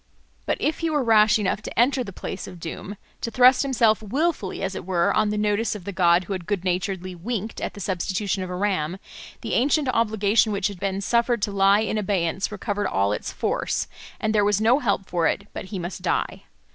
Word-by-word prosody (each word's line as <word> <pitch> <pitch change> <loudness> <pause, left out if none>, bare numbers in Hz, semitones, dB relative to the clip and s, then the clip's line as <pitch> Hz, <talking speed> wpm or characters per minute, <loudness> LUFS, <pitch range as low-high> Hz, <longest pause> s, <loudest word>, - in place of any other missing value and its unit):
But - - +1
if 310 - 0
he 330 - 0
were 295 -3 +1
rash 215 -2 +5
enough 205 -1 -1
to - - -5
enter 255 +2 +3
the 200 - -8
place - - -6
of 180 -2 -10
doom, 185 +4 -7 0.2
to - - -2
thrust 250 +2 +5
himself 235 -6 +2
wilfully, 255 - -1
as 195 0 -2
it - - -6
were, 175 -2 +1
on 215 -1 +2
the 210 - -1
notice 210 +2 0
of 205 - -8
the 200 - -5
god 175 -1 +3
who 195 - -4
had 180 -3 -6
good 205 -4 -1
naturedly 185 0 -2
winked 215 +4 -4
at - - -4
the - - -9
substitution 190 +1 -2
of 185 - -4
a 180 - -4
ram, 185 -3 -1 0.4
the - - -4
ancient 285 +3 +2
obligation 220 -2 +2
which 200 0 0
had 200 -3 -9
been 195 0 -2
suffered 235 +1 +1
to 205 - 0
lie 200 +1 +4
in 220 0 -1
abeyance 190 -1 -1
recovered 205 0 -2
all 100 +1 +1
its - - -4
force, - - -1 0.3
and 215 0 0
there 210 -1 +3
was 205 0 +2
no 230 +5 +4
help 200 -7 0
for 170 -2 +1
it 200 - -1
but - - -6
he 195 +1 -6
must 175 +1 -5
die. - - -2
205 Hz, 220 wpm, -24 LUFS, 185-220 Hz, 0.4 s, rash